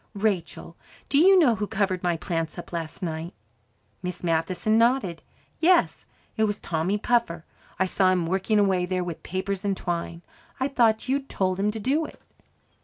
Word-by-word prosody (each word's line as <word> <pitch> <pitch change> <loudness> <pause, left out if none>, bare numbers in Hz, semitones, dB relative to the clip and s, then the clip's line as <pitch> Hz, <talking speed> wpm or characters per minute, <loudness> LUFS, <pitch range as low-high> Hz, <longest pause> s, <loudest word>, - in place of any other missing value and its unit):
"Rachel, 190 -5 -2 0.3
do 280 - +3
you 380 +4 +7
know 295 -10 +5
who 210 -1 -3
covered 190 -3 -1
my 175 -2 0
plants 165 -1 -3
up 175 - -9
last 165 +2 -5
night?" 165 0 -4 0.7
Miss 180 0 -5
Matheson 175 +5 +1
nodded. 230 -8 +2 0.4
"Yes, 350 +1 +3 0.3
it 220 - +3
was 205 -1 -2
Tommy 175 +5 -1
Puffer. 210 -8 0 0.3
I 190 - +2
saw 185 0 +2
him 180 -2 +1
working 190 +5 0
away 190 -3 +2
there 185 0 -1
with 175 -2 -6
papers 190 +2 -3
and 200 -2 0
twine. 170 -1 -4 0.4
I 265 +1 0
thought 230 -4 +2
you'd 275 +1 -1
told 185 -1 -1
him 205 +2 +2
to 220 +1 -4
do 285 +9 +1
it." - - -15
190 Hz, 175 wpm, -25 LUFS, 175-220 Hz, 0.7 s, you